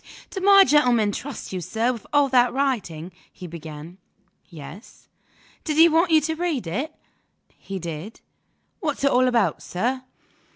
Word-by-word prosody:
"Did 380 - -5
my 395 0 +7
gentleman 245 - +3
trust 255 -1 -7
you, 185 - -3
sir, 230 +8 -1
with 230 - -11
all 290 -1 +4
that 250 -2 +4
writing?" 205 - -2 0.2
he 185 - -11
began. 160 +1 -9 0.5
"Yes." 170 - -12 0.6
"Did 305 -2 -2
he 330 +1 +8
want 330 +3 +2
you 320 -1 +6
to 320 +2 -1
read 320 - -2
it?" 260 - -3 0.6
"He 195 - -7
did." 170 +4 -7 0.6
"What's 300 -6 -3
it 280 - +3
all 255 +1 +3
about, 235 -4 +1
sir?" 245 +8 -2
245 Hz, 155 wpm, -23 LUFS, 185-295 Hz, 0.6 s, he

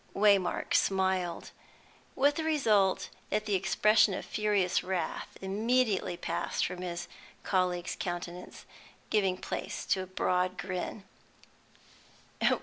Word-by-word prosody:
'" - - -30
Waymark 200 -3 +3
smiled, 190 -3 +1 0.6
with 285 +2 +4
the 320 - -1
result 220 -12 +2 0.2
that 215 0 0
the 210 - -1
expression 210 +1 +4
of - - -5
furious 205 -4 +1
wrath 185 -1 -3
immediately 215 -1 +1
passed - - -1
from 180 0 -5
his 175 -1 -4 0.4
colleague's 180 -2 0
countenance, 175 0 -5 0.5
giving 195 -4 +2
place - - -5
to 190 - +1
a 185 - -6
broad 185 0 0
grin. 185 +2 -4
190 Hz, 115 wpm, -30 LUFS, 180-210 Hz, 0.6 s, with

